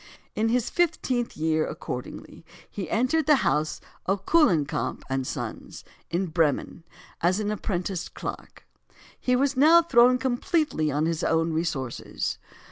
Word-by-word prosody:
In 220 +1 0
his 240 0 0
fifteenth 280 -8 0
year, 155 0 +1
accordingly, - - -7 0.2
he 190 -6 -6
entered 275 +8 +1
the 300 - +7
house 150 +3 0 0.3
of 195 +1 -1
Kuhlenkamp 175 - +2
and 135 -1 -1
Sons, - - -6 0.3
in 180 +3 0
Bremen, 165 -1 0 0.4
as 180 +4 +2
an 210 0 -1
apprenticed 190 -3 -3
clerk. - - -7 0.5
He 250 - +1
was 275 +2 +1
now 320 +6 +6
thrown 250 -5 +5
completely 255 - 0
upon 150 +2 0
his 165 -1 -1
own 165 0 +1
resources. 155 -7 -3
195 Hz, 130 wpm, -26 LUFS, 160-255 Hz, 0.5 s, the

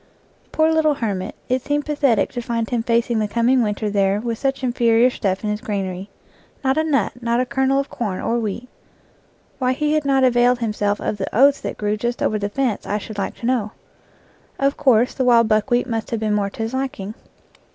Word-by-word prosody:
Poor 315 0 +3
little 310 -2 +2
hermit, 200 -5 -3
it 255 +1 0
seemed 290 +2 -1
pathetic 285 -6 +1
to 245 - -4
find 230 -1 -3
him 240 -2 +1
facing 235 0 +1
the 215 - 0
coming 235 +4 +2
winter 210 -1 -1
there 200 -1 +1
with 230 0 -3
such 270 -1 -1
inferior 240 -1 +3
stuff 195 -4 -2
in 210 - -1
his 210 +1 -3
granary. 195 -2 -4 0.5
Not 265 0 +2
a 315 - +2
nut, 275 -6 0
not 235 0 +1
a 255 - +1
kernel 265 +2 +1
of 275 - -2
corn 205 -6 -3
or 235 +1 0
wheat. 230 +2 -4 0.9
Why 255 -1 +1
he 300 +2 0
had 310 -1 +1
not 270 -1 +2
availed 245 0 +4
himself 210 -3 -1
of 210 - -2
the 190 - -3
oats 275 +4 +5
that - - -5
grew 210 0 -1
just 240 +3 -2
over 215 - +1
the 205 0 -2
fence 245 -1 -2
I 210 - 0
should 210 0 -7
like 195 - -3
to - - -4
know. 230 -4 0 0.8
Of 275 +1 +1
course, 250 -4 +3
the 260 - -1
wild 235 -2 +5
buckwheat 235 +3 +2
must 225 -3 -3
have 230 - -2
been 215 -1 0
more 205 -1 0
to 225 - -5
his 225 +3 -4
liking. 260 -7 -3
235 Hz, 215 wpm, -21 LUFS, 210-260 Hz, 0.9 s, oats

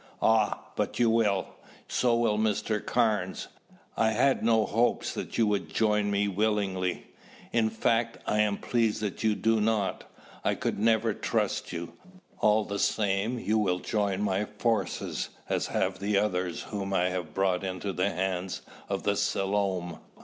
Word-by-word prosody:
"Ah, 110 -1 +3
but - - -2
you 120 -2 +4
will. 105 -4 +2 0.4
So 120 -2 +2
will 115 -3 +2
Mr. 110 0 0
Carnes. 110 -6 0 0.5
I 110 -1 +2
had 130 +4 +2
no 110 -1 +4
hopes 120 +2 +1
that - - -5
you 115 - +4
would 105 -2 -1
join 105 -2 +2
me 100 0 +1
willingly. 100 -3 0 0.5
In 115 -2 +3
fact, 115 +1 0
I 105 - +1
am 105 -1 +2
pleased 115 -3 0
that 105 0 -3
you 110 -1 +3
do 115 0 +2
not. 105 -2 0 0.4
I - - +1
could - - -2
never 110 0 +3
trust - - -1
you. 85 -1 -5 0.5
All 105 0 +3
the 100 0 -4
same, 105 +3 +1
you 110 -1 +1
will 90 -4 +1
join 100 0 -1
my 100 0 0
forces 105 -2 -1 0.2
as - - 0
have 95 0 -1
the 100 +1 +1
others 90 -4 0
whom 100 -2 -4
I 90 -1 +2
have 90 -4 -4
brought 95 -1 +1
into 95 +1 -3
the 95 +2 +1
hands 95 0 -2 0.3
of 100 -1 -2
the 100 - +1
Selom. 95 -3 -1
105 Hz, 160 wpm, -28 LUFS, 95-110 Hz, 0.5 s, you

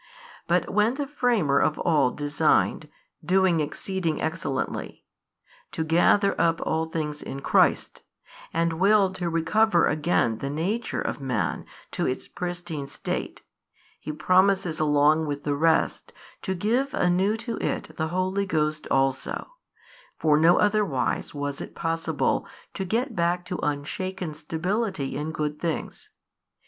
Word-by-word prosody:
But - - +2
when 215 +4 +2
the 285 0 -2
Framer 235 - +1
of 155 - +1
all 150 -6 +3
designed 145 +2 +1 0.3
(doing 185 -2 +3
exceeding 165 +1 -2
excellently) 160 -5 -3 0.7
to 160 - -1
gather 175 +5 +3
up 165 0 +2
all 160 0 0
things 150 -2 -3
in 135 - -6
Christ, - - +2 0.5
and 165 0 0
willed 195 -1 +4
to 175 -2 -2
recover 170 +3 +3
again 150 -7 +1
the 140 - -3
nature 185 +11 -2
of - - -3
man 125 -5 -2 0.2
to - - -1
its 130 - -3
pristine 175 -5 -5
state, - - -5 0.6
He 155 - -5
promises 185 +2 +2
along 150 +1 +3
with 145 -1 -4
the 145 - 0
rest 160 +2 +1 0.3
to 190 - -2
give 240 +9 0
anew 185 +5 +2
to 230 0 -4
it 155 - -3
the 160 - -1
Holy 185 +3 -1
Ghost 155 -2 0
also, 135 - 0 0.7
for 155 -2 +3
no 165 +3 +5
otherwise 205 -11 0
was 145 -1 -3
it - - -8
possible 165 0 -1 0.3
to 190 - -3
get 235 +6 -1
back 175 +1 0
to 180 - -4
unshaken 155 +4 -3
stability 165 - -2
in 150 +2 -3
good 150 -1 -3
things. 165 -2 -4
165 Hz, 135 wpm, -25 LUFS, 150-190 Hz, 0.7 s, no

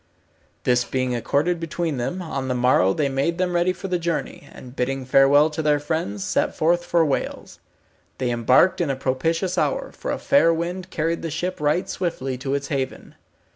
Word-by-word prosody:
This 125 -1 +3
being 130 0 -2
accorded 150 +8 0
between 165 -2 -3
them, 175 +10 -3
on 135 -5 -4
the 125 - -1
morrow 120 -7 +3
they 145 +8 0
made 140 +5 -1
them 180 -1 0
ready 175 +1 +2
for 195 +1 -6
the 180 -1 -1
journey, 170 0 -3
and 125 0 -12
bidding 130 +1 -2
farewell 140 +4 +5
to 155 - -3
their 150 -1 +2
friends, 145 - -3
set - - 0
forth 175 +2 +2
for 170 -1 +2
Wales. 140 - -3 0.6
They 125 -2 -1
embarked 125 +11 +3
in 165 - 0
a 135 - 0
propitious 165 +8 -1
hour, - - -1
for - - -7
a - - -1
fair 275 -12 +4
wind 175 +2 -3
carried 165 0 -1
the 165 - -3
ship 160 +2 -3
right 150 +4 +1
swiftly 150 -8 -3
to 135 +1 -2
its 140 -1 -4
haven. 135 -2 -4
150 Hz, 190 wpm, -23 LUFS, 130-175 Hz, 0.6 s, farewell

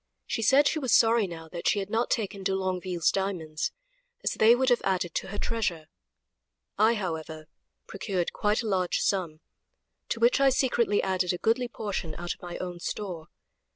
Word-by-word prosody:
She - - -2
said 275 +5 +5
she 315 - 0
was 260 -5 +3
sorry 225 -2 +4
now 165 -2 -8 0.2
she - - +3
had 195 0 -3
not 230 +2 +1
taken 200 -3 -2
de 190 0 0
Longueville's 185 -2 0
diamonds, 170 -6 -2 0.5
as - - +1
they 225 +2 +5
would 260 +1 +2
have 245 - +3
added 180 -3 0
to - - -2
her 205 - -6
treasure; 205 -9 -2 0.9
I, 220 +2 +4
however, 160 -5 -4 0.4
procured 190 -3 -3
quite 210 +3 +1
a - - -3
large 185 -3 +1
sum, 170 -5 -1 0.7
to 230 - -2
which 235 +3 +4
I 275 0 +5
secretly 240 -5 +2
added 185 -2 0
a - - -3
goodly 230 +5 +1
portion 200 -8 -4
out 175 0 -3
of - - -21
my 175 -1 -6
own 180 -1 -5
store. 175 -3 -5
195 Hz, 180 wpm, -28 LUFS, 175-225 Hz, 0.9 s, said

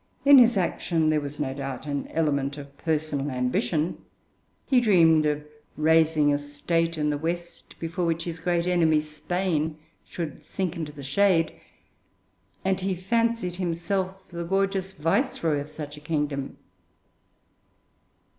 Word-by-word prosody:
In 280 -1 +9
his 240 -3 +5
action 165 -3 +1
there 155 -1 +2
was, 145 0 -6
no 135 -2 -1
doubt, 135 +1 -5
an 140 -1 -3
element 140 -3 0
of 140 -1 -10
personal 150 -3 -1
ambition; 125 +5 0 0.7
he 255 -3 +4
dreamed 165 -8 +5
of 150 0 -1 0.3
raising 155 -1 +4
a 145 - +1
State 165 +3 -1
in 150 -1 +1
the 145 - -2
West 170 +2 -5
before 170 +2 -3
which 165 0 0
his 170 -1 -5
great 175 0 0
enemy, 165 -4 +3
Spain, 155 +1 -2 0.3
should 165 -5 -6
sink 185 -3 -3
into 160 -3 -4
the 145 -1 -10
shade, 165 +3 +2 1.1
and 190 -1 +1
he 190 0 0
fancied 230 -1 0
himself 185 +2 -2
the 170 -1 -5
gorgeous 195 +1 0
viceroy 165 -2 0
of 145 +1 -6
such 150 -1 -7
a - - -11
kingdom. 150 -3 -2
160 Hz, 140 wpm, -26 LUFS, 150-180 Hz, 1.1 s, In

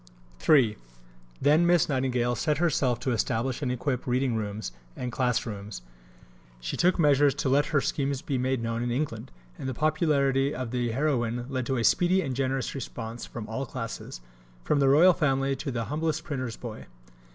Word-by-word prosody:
III 125 -8 +5 0.6
Then 155 +4 +4
Miss 175 -1 +4
Nightingale 125 -3 0
set 150 +2 0
herself 135 -7 +1
to 130 - 0
establish 120 +3 -1
and 130 -3 -1
equip 125 0 -2
reading 125 0 +1
rooms 105 - -3 0.2
and 125 -1 -4
class 125 -1 0
rooms. 100 - -7 0.8
She - - -4
took 180 +1 +3
measures 145 -3 +4
to 135 - -1
let 145 +3 +3
her 150 -3 +2
schemes 140 -1 -1
be 135 -3 -1
made 130 -1 0
known 115 0 -2
in 120 - -1
England, 120 -2 -3 0.3
and 130 - -3
the 130 - -4
popularity 140 -3 +2
of 125 -2 -4
the 120 -1 -1
heroine 120 -2 0
led 130 -2 -2
to 135 - 0
a 115 - 0
speedy 180 +8 +3
and 135 -4 -3
generous 135 0 -1
response 115 -3 -6
from 115 -3 -7
all 125 +5 -4
classes 115 - -6 0.4
from 145 - +1
the 135 -1 +4
Royal 170 +7 +7
Family 135 -4 +1
to 150 - -4
the 115 -3 -2
humblest 155 +3 -2
printer's 130 -8 -4
boy. 115 -3 -8
130 Hz, 180 wpm, -27 LUFS, 120-145 Hz, 0.8 s, Royal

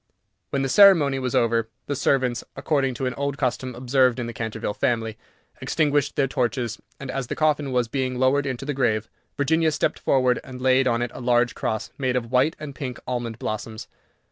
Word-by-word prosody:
When 135 -1 -1
the - - 0
ceremony 150 -4 +6
was 130 -2 -2
over, 115 -1 +2 0.2
the 145 - -2
servants, 130 -3 +1
according 135 -2 0
to 130 - -3
an 125 - -1
old 140 +2 -3
custom 130 -2 -2
observed 130 0 +2
in 120 - -2
the 120 - -6
Canterville 110 -2 -3
family, 115 -1 -1 0.5
extinguished 145 -2 +1
their 140 - +2
torches, 125 -3 -2 0.2
and, 140 -2 -5
as 135 -3 -3
the - - -3
coffin 150 -3 +1
was 125 -2 +1
being 130 0 -2
lowered 135 +2 +2
into 130 0 -4
the 145 - -2
grave, 110 -5 0 0.3
Virginia 160 +3 +2
stepped 150 - -1
forward, 130 -2 +2
and 130 -1 -9
laid 130 +1 +3
on 120 -1 +1
it 120 - -4
a - - -8
large 120 -1 +2
cross 110 - -3
made 130 -2 0
of 120 -2 -2
white 130 +5 +3
and 150 -2 -7
pink 130 -4 -6
almond 120 -3 -3
blossoms. 110 0 -5
130 Hz, 195 wpm, -24 LUFS, 120-140 Hz, 0.5 s, ceremony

